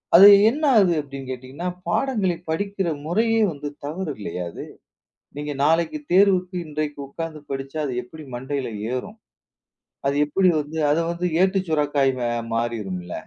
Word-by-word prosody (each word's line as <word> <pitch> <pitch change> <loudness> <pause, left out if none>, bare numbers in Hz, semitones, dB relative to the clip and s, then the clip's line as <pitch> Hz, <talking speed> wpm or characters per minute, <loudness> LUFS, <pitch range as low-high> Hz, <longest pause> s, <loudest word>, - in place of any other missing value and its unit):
அது 195 +3 +11 0.2
என்ன 295 +7 -3
ஆகுது 190 -5 +5
அப்படின்னு 135 -2 -9
கேட்டீங்கன்னா, 130 +7 -6 0.2
பாடங்களை 200 -4 +1
படிக்கிற 195 +2 -1 0.2
முறையே 225 +7 +2
வந்து 145 0 -6 0.2
தவறு 165 +2 -3
இல்லையா 90 -3 -5
அது? - - -7 0.7
நீங்க 145 0 -4
நாளைக்கு 165 - +2
தேர்வுக்கு 185 -1 +4
இன்றைக்கு 150 -1 -3
உக்காந்து 160 +1 -6
படிச்சா 135 +2 -4
அது 130 - -3
எப்படி 155 +6 -12
மண்டையில 130 +1 -3 0.3
ஏறும்? 205 - -5 0.9
அது 140 - +1
எப்படி 185 +5 +2
வந்து 150 +2 -6
அதை 160 +3 +2
வந்து 175 +1 -2 0.2
ஏட்டுச் 190 -2 +1
சுரைக்காய் 145 -3 +2 0.4
மாறிடும்ல. 105 -7 -3
155 Hz, 135 wpm, -23 LUFS, 135-185 Hz, 0.9 s, அது